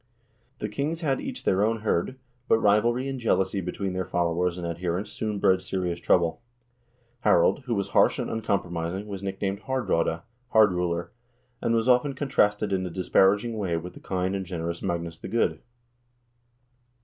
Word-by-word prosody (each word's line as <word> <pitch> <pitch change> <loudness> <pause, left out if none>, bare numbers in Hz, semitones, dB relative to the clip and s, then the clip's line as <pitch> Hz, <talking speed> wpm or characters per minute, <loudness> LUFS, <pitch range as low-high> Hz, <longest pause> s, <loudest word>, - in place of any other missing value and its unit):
The - - -3
kings 155 +4 -2
had 140 -5 0
each 270 -2 -6
their 95 +2 +2
own 110 0 0
hird, 110 +4 0 0.3
but - - +5
rivalry 115 +5 +2
and 135 -1 -3
jealousy 95 -4 +1
between 95 +1 -3
their 95 0 -1
followers 85 0 0
and 90 - -4
adherents 85 +3 -3
soon 105 -2 -3
bred 95 -1 +3
serious 90 -3 -2
trouble. 85 +4 +2 0.8
Harald, 120 +5 +3
who 120 -3 -1
was 100 -1 -2
harsh - - +4
and - - -2
uncompromising, 95 -4 -2
was 100 -2 -6
nicknamed 95 0 -3
Haardraade 105 -10 -1 0.3
(Hard 110 -3 +6
ruler), 85 -1 -2 0.5
and 115 - +1
was 115 +1 +1
often 130 +2 +3
contrasted 105 -7 +1
in 95 -1 0
a 90 - -3
disparaging 100 +5 +2
way 90 -5 0
with 90 +2 -6
the - - -12
kind 95 0 -2
and 95 - -2
generous 85 -2 -4
Magnus 85 -2 -3
the - - -7
Good. 115 +4 +1
95 Hz, 165 wpm, -26 LUFS, 90-115 Hz, 0.8 s, Hard